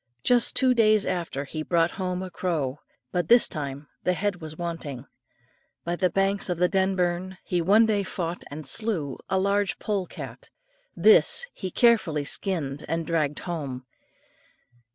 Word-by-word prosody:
Just 245 Hz, -1 st, +3 dB
two 260 Hz, -1 st, +4 dB
days 215 Hz, -3 st, +4 dB
after, 170 Hz, -6 st, -3 dB
he 155 Hz, +3 st, -5 dB
brought 165 Hz, +1 st, +1 dB
home 185 Hz, -1 st, -3 dB
a 185 Hz, -, -7 dB
crow, 150 Hz, -8 st, -2 dB, 0.3 s
but 175 Hz, -3 st, -1 dB
this 240 Hz, +4 st, +6 dB
time 140 Hz, -2 st, -5 dB, 0.2 s
the 180 Hz, -, +2 dB
head 195 Hz, -1 st, -2 dB
was 155 Hz, 0 st, -8 dB
wanting. 165 Hz, -7 st, -5 dB, 0.8 s
By 170 Hz, +1 st, -2 dB
the 185 Hz, +1 st, +1 dB
banks 195 Hz, +2 st, 0 dB
of 175 Hz, -, -1 dB
the 180 Hz, +1 st, +3 dB
Denburn 185 Hz, -1 st, 0 dB
he 175 Hz, -1 st, -1 dB
one 205 Hz, +7 st, +5 dB
day 210 Hz, -2 st, +1 dB
fought 180 Hz, -3 st, -4 dB
and 150 Hz, +1 st, -7 dB
slew 165 Hz, -, -1 dB
a 190 Hz, -, +1 dB
large 200 Hz, +1 st, +1 dB
pole 200 Hz, -4 st, -2 dB
cat; -, -, -9 dB, 0.5 s
this 470 Hz, +1 st, +5 dB
he 190 Hz, -, -5 dB
carefully 190 Hz, -, +3 dB
skinned, 150 Hz, -3 st, -2 dB
and 165 Hz, +1 st, -2 dB
dragged 150 Hz, -3 st, 0 dB
home. 140 Hz, -8 st, -5 dB
180 Hz, 155 wpm, -26 LUFS, 155-195 Hz, 0.8 s, this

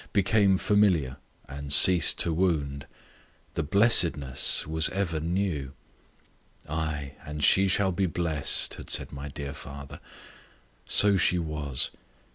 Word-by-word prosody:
became 100 Hz, -1 st, +2 dB
familiar, 95 Hz, -11 st, +1 dB, 0.3 s
and 70 Hz, +1 st, -9 dB
ceased 90 Hz, +3 st, +5 dB
to 85 Hz, -, -1 dB
wound; 75 Hz, -6 st, -2 dB, 0.7 s
the -, -, -3 dB
blessedness 80 Hz, -, +3 dB
was 80 Hz, 0 st, -1 dB
ever 90 Hz, -5 st, -3 dB
new. 80 Hz, -5 st, -3 dB, 0.9 s
"Ay, 75 Hz, -2 st, -4 dB
and 75 Hz, 0 st, -7 dB
she 95 Hz, 0 st, +4 dB
shall 95 Hz, +1 st, 0 dB
be 95 Hz, +1 st, -1 dB
blessed," 80 Hz, -4 st, 0 dB
had -, -, -11 dB
said -, -, 0 dB
my 70 Hz, +1 st, -8 dB
dear 70 Hz, 0 st, -8 dB
father. 70 Hz, 0 st, -11 dB, 0.9 s
So 100 Hz, -1 st, +3 dB
she 90 Hz, 0 st, +2 dB
was. 75 Hz, -5 st, -2 dB
80 Hz, 120 wpm, -26 LUFS, 70-95 Hz, 0.9 s, ceased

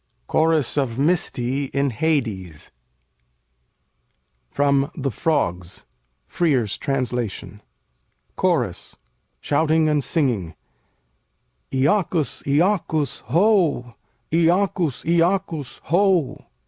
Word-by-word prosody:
CHORUS 160 Hz, -, +1 dB
OF 125 Hz, -5 st, 0 dB
MYSTÆ 140 Hz, -4 st, 0 dB
IN 140 Hz, -1 st, +1 dB
HADES 110 Hz, -, -2 dB, 1.8 s
From 140 Hz, -, +1 dB
'The 140 Hz, -4 st, -2 dB
Frogs': 90 Hz, -, -2 dB, 0.4 s
Frere's 130 Hz, -, 0 dB
Translation 125 Hz, -6 st, -3 dB, 0.7 s
CHORUS 140 Hz, -, -1 dB, 0.5 s
[shouting 155 Hz, +2 st, +2 dB
and 150 Hz, -2 st, +1 dB
singing'] 115 Hz, -, -1 dB, 1.2 s
Iacchus! 155 Hz, +3 st, +1 dB
Iacchus! 155 Hz, -1 st, +1 dB
Ho! 165 Hz, -, +2 dB, 0.4 s
Iacchus! 170 Hz, -3 st, +1 dB
Iacchus! 170 Hz, -3 st, 0 dB
Ho! 180 Hz, -3 st, +1 dB
145 Hz, 70 wpm, -22 LUFS, 125-165 Hz, 1.8 s, shouting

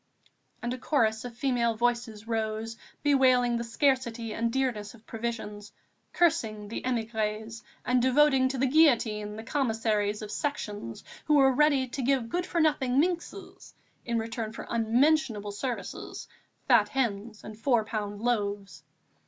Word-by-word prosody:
And 240 Hz, +1 st, -1 dB
a 255 Hz, -, -6 dB
chorus 220 Hz, -5 st, +1 dB
of 240 Hz, -1 st, -8 dB
female 240 Hz, -3 st, +1 dB
voices 235 Hz, -2 st, -1 dB
rose, 225 Hz, 0 st, -2 dB, 0.3 s
bewailing 255 Hz, -4 st, +4 dB
the 235 Hz, -, -2 dB
scarcity 235 Hz, -2 st, 0 dB
and 230 Hz, 0 st, -1 dB
dearness 235 Hz, -5 st, -2 dB
of 225 Hz, -1 st, -20 dB
provisions, 220 Hz, -3 st, -5 dB, 0.4 s
cursing 225 Hz, -12 st, +1 dB
the 230 Hz, -, -4 dB
émigrés 220 Hz, -2 st, -2 dB, 0.2 s
and 250 Hz, 0 st, +3 dB
devoting 260 Hz, +1 st, +4 dB
to 270 Hz, -, -3 dB
the 260 Hz, -, +2 dB
guillotine 230 Hz, -8 st, +3 dB
the 220 Hz, -, -7 dB
Commissaries 220 Hz, -5 st, 0 dB
of 210 Hz, -, -7 dB
Sections 210 Hz, -, -4 dB, 0.2 s
who 300 Hz, -, +3 dB
were 270 Hz, -2 st, +5 dB
ready 280 Hz, -1 st, +3 dB
to 270 Hz, +2 st, -4 dB
give 255 Hz, -2 st, +1 dB
good 355 Hz, +7 st, -2 dB
for 345 Hz, -, -1 dB
nothing 280 Hz, -5 st, +2 dB
minxes, 345 Hz, +2 st, -3 dB, 0.3 s
in 235 Hz, -1 st, -1 dB
return 225 Hz, -1 st, -3 dB
for -, -, -7 dB
unmentionable 230 Hz, -1 st, +2 dB
services, 240 Hz, +4 st, -5 dB, 0.4 s
fat -, -, +5 dB
hens 225 Hz, -5 st, -2 dB
and 215 Hz, -, -8 dB
four 235 Hz, -3 st, +2 dB
pound 210 Hz, -1 st, -4 dB
loaves. 205 Hz, -4 st, -1 dB
235 Hz, 145 wpm, -28 LUFS, 220-265 Hz, 0.4 s, were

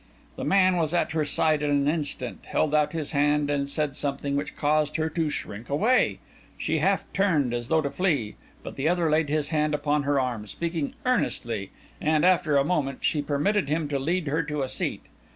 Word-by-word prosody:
The -, -, -5 dB
man 185 Hz, -2 st, +4 dB
was 165 Hz, 0 st, 0 dB
at 175 Hz, -, +1 dB
her 160 Hz, -1 st, 0 dB
side 150 Hz, +1 st, +1 dB
in 150 Hz, -, 0 dB
an 140 Hz, -1 st, +2 dB
instant, 145 Hz, -6 st, -3 dB
held 155 Hz, -1 st, 0 dB
out 150 Hz, -1 st, +3 dB
his 160 Hz, -3 st, -4 dB
hand, 145 Hz, 0 st, +2 dB
and 140 Hz, -1 st, -1 dB
said 145 Hz, -1 st, -1 dB
something, 140 Hz, 0 st, -1 dB
which 145 Hz, +1 st, -3 dB
caused 150 Hz, 0 st, +1 dB
her 160 Hz, 0 st, 0 dB
to 160 Hz, -1 st, 0 dB
shrink 110 Hz, -5 st, -6 dB
away. 220 Hz, -, +2 dB, 0.4 s
She 160 Hz, 0 st, -1 dB
half 195 Hz, +5 st, +2 dB
turned, 155 Hz, -11 st, +2 dB
as 120 Hz, -1 st, -3 dB
though 160 Hz, +3 st, +3 dB
to 140 Hz, -, -2 dB
flee, 145 Hz, -, 0 dB, 0.3 s
but -, -, -8 dB
the 140 Hz, +4 st, +1 dB
other 170 Hz, -3 st, +1 dB
laid 155 Hz, -1 st, +2 dB
his 150 Hz, -1 st, 0 dB
hand 150 Hz, -1 st, +1 dB
upon 150 Hz, 0 st, 0 dB
her 140 Hz, 0 st, +1 dB
arm, 120 Hz, -5 st, -2 dB
speaking 165 Hz, -, -3 dB
earnestly, 115 Hz, -, 0 dB, 0.3 s
and, 155 Hz, +1 st, +2 dB
after 175 Hz, -5 st, +3 dB
a 140 Hz, -, +3 dB
moment, 140 Hz, -6 st, -1 dB
she 150 Hz, -, +2 dB
permitted 145 Hz, +4 st, 0 dB
him 155 Hz, 0 st, 0 dB
to 140 Hz, -1 st, -1 dB
lead 170 Hz, +5 st, -1 dB
her 150 Hz, +3 st, 0 dB
to 150 Hz, -2 st, -3 dB
a 130 Hz, -, -3 dB
seat. -, -, -3 dB
150 Hz, 205 wpm, -26 LUFS, 140-160 Hz, 0.4 s, man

